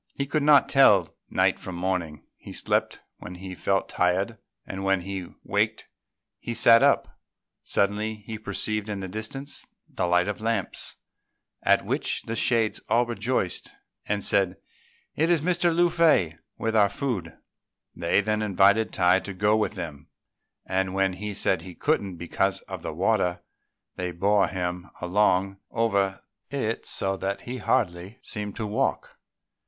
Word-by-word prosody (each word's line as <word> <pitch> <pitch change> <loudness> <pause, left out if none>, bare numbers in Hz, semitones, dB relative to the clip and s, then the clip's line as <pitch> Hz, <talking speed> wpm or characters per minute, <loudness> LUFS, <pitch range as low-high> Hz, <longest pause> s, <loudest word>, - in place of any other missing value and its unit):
He 140 - -1
could 150 +2 0
not 145 -1 +6
tell 105 -10 +5
night - - +2
from 90 - -6
morning; 85 -4 -2
he - - -11
slept - - -1 0.2
when 90 - -8
he 95 +1 -8
felt 95 +1 0
tired, 95 +5 0 0.3
and 95 0 -6
when 95 -1 +2
he 95 -1 -5 0.2
waked - - -1 0.5
he 120 - -5
sat 115 0 +7
up. - - +2 0.4
Suddenly, 105 +2 0
he 110 -1 -6
perceived 110 0 -3
in 100 -2 -3
the 95 - -4
distance 110 +8 -6 0.2
the 90 - -2
light 90 +1 +3
of 105 0 -3
lamps, 110 -4 -2 0.7
at - - +3
which - - -1
the 115 - -4
shades 115 -2 +1
all 120 +1 +4
rejoiced, 120 -5 -2 0.3
and 100 -1 -1
said, 95 -2 +2 0.6
"It 160 +3 +2
is 170 -4 +3
Mr. 175 0 +2
Lung 175 +1 +3
fei 155 - +3 0.2
with 110 0 -1
our 105 -2 +5
food." 100 -10 -3 0.6
They 85 +4 +2
then 105 +1 0
invited 100 +2 +3
Tai 90 +1 +4
to 100 0 -7
go 105 +3 +3
with 110 -1 0
them; 80 -6 -7 0.6
and 95 0 -1
when 95 -1 +2
he 105 +2 -5
said 95 -3 +1
he 90 0 -10
couldn't 100 - 0
because 85 +3 -1
of - - -8
the - - -4
water, 90 0 +1 0.6
they 90 -1 -2
bore 100 +3 +3
him 90 0 -4
along 95 +1 +2
over 100 -4 +1 0.3
it - - -2
so 95 0 -1
that 100 +1 -3
he 125 +1 -6
hardly 100 -4 -1
seemed 105 -3 -4
to 110 - -3
walk. 115 +6 -2
100 Hz, 155 wpm, -26 LUFS, 90-115 Hz, 0.7 s, sat